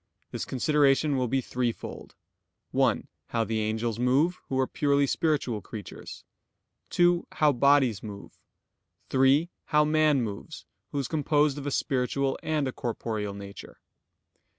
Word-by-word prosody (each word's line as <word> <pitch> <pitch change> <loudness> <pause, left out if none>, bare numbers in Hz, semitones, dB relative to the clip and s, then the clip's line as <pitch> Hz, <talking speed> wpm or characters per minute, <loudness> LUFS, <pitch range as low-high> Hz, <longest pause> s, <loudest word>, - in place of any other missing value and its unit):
This - - -4
consideration 145 +1 +2
will 130 -1 0
be 135 +3 +1
threefold: 125 -1 -4 0.6
(1) - - +1 0.2
How 115 -1 0
the 110 0 -2
angels 110 +1 -1
move, 140 +9 +2
who 130 - -1
are 130 - +3
purely 140 +1 +1
spiritual 140 -7 0
creatures; 100 0 -9 0.7
(2) 175 0 +3
How 150 -1 +4
bodies 135 -4 +3
move; 100 -2 -10 0.7
(3) 135 +6 +3
How 150 0 +3
man 155 -3 +3
moves, 105 -3 -7 0.3
who - - -4
is 135 -3 -1
composed 150 -1 +1
of 145 - -6
a - - -1
spiritual 135 0 0
and 150 -3 0
a - - -2
corporeal 110 -4 -4
nature. 100 0 -10
135 Hz, 135 wpm, -27 LUFS, 115-150 Hz, 0.7 s, How